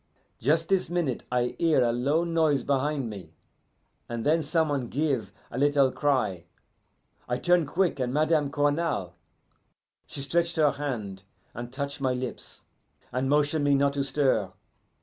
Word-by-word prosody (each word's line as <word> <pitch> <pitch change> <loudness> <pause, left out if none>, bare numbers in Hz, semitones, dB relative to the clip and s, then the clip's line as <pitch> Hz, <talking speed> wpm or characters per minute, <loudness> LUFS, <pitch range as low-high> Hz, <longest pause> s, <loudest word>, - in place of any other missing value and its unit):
"Just 160 +6 +1
this 190 -4 +2
minute 170 -8 -1
I 125 0 0
hear 160 -6 +3
a 120 - +2
low 140 +8 +1
noise 160 -4 +1
behind 140 -1 0
me, 100 -4 -9 0.7
and 115 -1 -4
then 160 +2 +3
some 160 +1 +1
one 135 -4 -1
give 130 -8 -1 0.2
a 120 - -4
little 140 -2 +3
cry. 120 - 0 0.8
I 125 - 0
turn 175 -1 +2
quick 180 -1 0
and 125 -1 -1
Madame 155 0 +2
Cournal. 145 - 0 0.9
She 140 - -6
stretch 170 +4 0
her 155 -3 +4
hand, 110 -10 -4 0.3
and 120 +1 -7
touch 140 +2 -4
my 130 -1 +1
lips, 125 -1 -6 0.5
and 130 +1 -1
motion 150 +1 +2
me 145 -1 +3
not 140 0 +2
to 140 -1 -1
stir. 135 -8 +1
140 Hz, 150 wpm, -27 LUFS, 125-155 Hz, 0.9 s, her